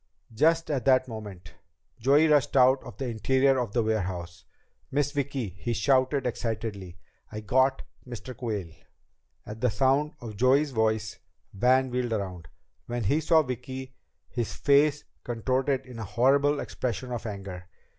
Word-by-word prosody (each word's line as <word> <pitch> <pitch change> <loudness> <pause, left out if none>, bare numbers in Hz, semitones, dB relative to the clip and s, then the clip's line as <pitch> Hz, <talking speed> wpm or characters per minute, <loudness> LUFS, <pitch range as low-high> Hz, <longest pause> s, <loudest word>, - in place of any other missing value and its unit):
Just 165 +7 +2
at 130 -5 -1
that 130 -1 +4
moment 100 - -9 0.5
Joey 140 +7 +4
rushed 145 -2 +3
out 130 +1 +5
of - - -11
the 135 - -3
interior 130 +4 +2
of 120 -5 -3
the 120 - +2
warehouse. 95 -4 -3 0.4
"Miss 145 +1 0
Vicki," 140 -5 -2
he 95 +7 -4
shouted 130 +3 +2
excitedly, 110 -6 -4 0.3
"I 110 0 -6
got 130 +5 +2 0.2
Mr. 120 +1 -8
Quayle!" 105 -8 -4 0.7
At 110 +1 -8
the 125 - +3
sound 135 +5 +1
of 110 -4 -8
Joey's 135 +5 +3
voice 110 -2 0 0.3
Van 130 +5 +3
wheeled 125 -2 -1
around. 95 -6 -4 0.4
When 120 0 -3
he 145 +10 +2
saw 160 0 +4
Vicki, 130 0 -6 0.3
his 120 -3 -4
face 145 +1 +3 0.2
contorted 130 +3 -1
in 125 -3 -10
a - - -4
horrible 140 +7 +2
expression 125 -1 -4
of 120 -1 -4
anger. 95 -3 -7
125 Hz, 145 wpm, -27 LUFS, 110-135 Hz, 0.7 s, out